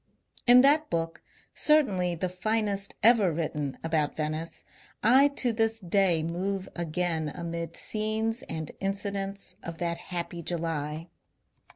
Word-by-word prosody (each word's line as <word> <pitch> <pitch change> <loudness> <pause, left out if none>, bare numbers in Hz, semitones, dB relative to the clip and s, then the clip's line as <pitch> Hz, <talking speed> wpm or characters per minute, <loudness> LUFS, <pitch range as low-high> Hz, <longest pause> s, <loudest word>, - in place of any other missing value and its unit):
In 245 +1 +9
that 295 +3 +4
book 165 0 -2 0.2
— - - -36
certainly 195 - +3
the 175 +3 -2
finest 200 +2 -1
ever 220 -5 +6
written 150 -3 -3
about 160 -2 0
Venice 155 +1 -3 0.2
— - - -32 0.2
I 280 - +7
to 255 -4 0
this 225 0 +1
day 180 -3 +2
move 185 +4 -2
again 165 -2 -1
amid 170 -1 -5
scenes 220 +2 -1
and 160 -2 -4
incidents 195 0 -3
of 165 0 -7
that 170 0 -2
happy 175 -1 -4
July. 165 -1 -3
180 Hz, 135 wpm, -28 LUFS, 165-215 Hz, 0.2 s, In